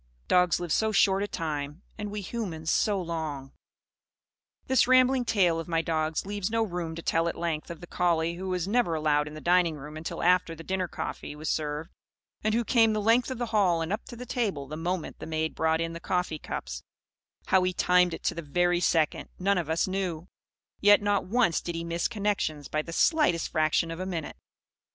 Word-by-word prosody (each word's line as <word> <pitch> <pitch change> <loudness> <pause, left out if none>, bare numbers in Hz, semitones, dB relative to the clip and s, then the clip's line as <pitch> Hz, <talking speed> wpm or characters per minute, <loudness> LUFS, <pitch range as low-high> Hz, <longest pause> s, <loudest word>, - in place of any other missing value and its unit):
Dogs 180 -1 +3
live 175 -3 -2
so 220 0 +2
short 195 -1 +3
a 205 - -1
time; 150 -1 -4
and 210 0 -5
we 210 0 -4
humans 180 -7 -3
so 205 -2 +2
long! 160 -6 -4 1.1
This 260 -2 +3
rambling 255 0 +4
tale 180 -7 +2
of 165 - -6
my 165 -1 0
dogs 155 0 -1
leaves 205 -1 -2
no 225 0 +1
room 175 -5 -4
to 165 - -7
tell 165 +1 +1
at 170 - -3
length 165 -3 -3
of 170 -1 -8
the - - -7
collie 170 -2 +1
who 185 +2 -5
was 180 -1 -1
never 210 -6 +1
allowed 150 -1 +1
in 150 - -8
the - - -7
dining 175 -2 +3
room 150 +1 -9
until 155 +1 -5
the - - -1
after 180 -2 +3
dinner 185 +3 -2
coffee 150 - -6
was 155 +1 -3
served; 150 0 -3 0.5
and 215 +1 +1
who 235 - +2
came 225 -1 +4
the 215 - 0
length 230 +4 +3
of 260 - -4
the 240 - -1
hall 180 -6 +3
and 165 +5 -2
up 215 - -3
to 240 - -9
the 250 +1 -8
table 200 - -2
the 155 - -6
moment 170 +1 -3
the - - -7
maid 160 0 -1
brought 160 0 +1
in 165 0 -2
the 170 - -6
coffee 175 -3 -1
cups - - -5 0.7
(how 190 - +5
he 185 0 +1
timed 180 -1 +3
it - - -12
to - - +1
the 170 - -5
very 175 +3 +1
second, 160 -3 +1
none 195 0 +2
of 165 -3 -4
us 160 +3 +1
knew; 185 -3 -3 0.5
yet 205 0 +6
not 205 -2 0
once 225 -5 +2
did 170 - -5
he 165 - -3
miss 170 0 -1
connections 200 - -2
by 155 - -1
the 165 - -9
slightest 175 - +2
fraction 155 +1 +1
of 165 - -6
a 185 - -3
minute). 170 -4 -4
175 Hz, 215 wpm, -28 LUFS, 160-200 Hz, 1.1 s, yet